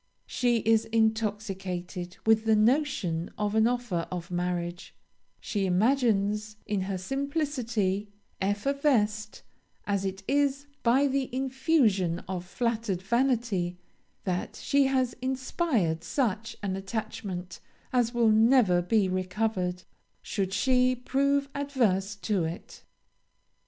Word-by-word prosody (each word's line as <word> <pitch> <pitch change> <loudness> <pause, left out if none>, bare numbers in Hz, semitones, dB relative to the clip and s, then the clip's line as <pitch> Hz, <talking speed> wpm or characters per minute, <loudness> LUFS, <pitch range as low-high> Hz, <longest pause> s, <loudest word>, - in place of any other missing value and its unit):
She 240 -2 +1
is 225 +1 +3
intoxicated 200 -5 -2
with 220 0 +4
the 220 -1 +4
notion 215 - +1
of 210 -1 -1
an 220 +1 +4
offer 240 -9 -1
of 175 -1 -6
marriage; 175 0 -3 0.4
she 200 -2 -1
imagines, 215 0 +1
in 205 -2 -1
her 190 0 -2
simplicity, 235 - -1 0.3
effervesced 215 0 0 0.4
as 200 -1 0
it 195 0 -4
is 280 0 +1 0.2
by 255 +4 +4
the 275 -1 0
infusion 255 - +1
of 180 -1 -4
flattered 220 -2 -2
vanity, 225 -6 +1 0.5
that 180 -2 -2
she 280 0 +2
has 260 -2 +1
inspired 255 - 0
such 230 -3 -1
an 190 -2 -1
attachment 195 -3 -5 0.3
as 245 -2 +2
will 235 -2 +3
never 220 -5 +5
be 200 +2 +2
recovered, 185 0 -1 0.4
should 195 -3 -2
she 255 +4 +3
prove 280 +3 +1
adverse 225 -9 0
to 200 -1 -1
it. 165 +2 -6
215 Hz, 110 wpm, -28 LUFS, 190-255 Hz, 0.5 s, never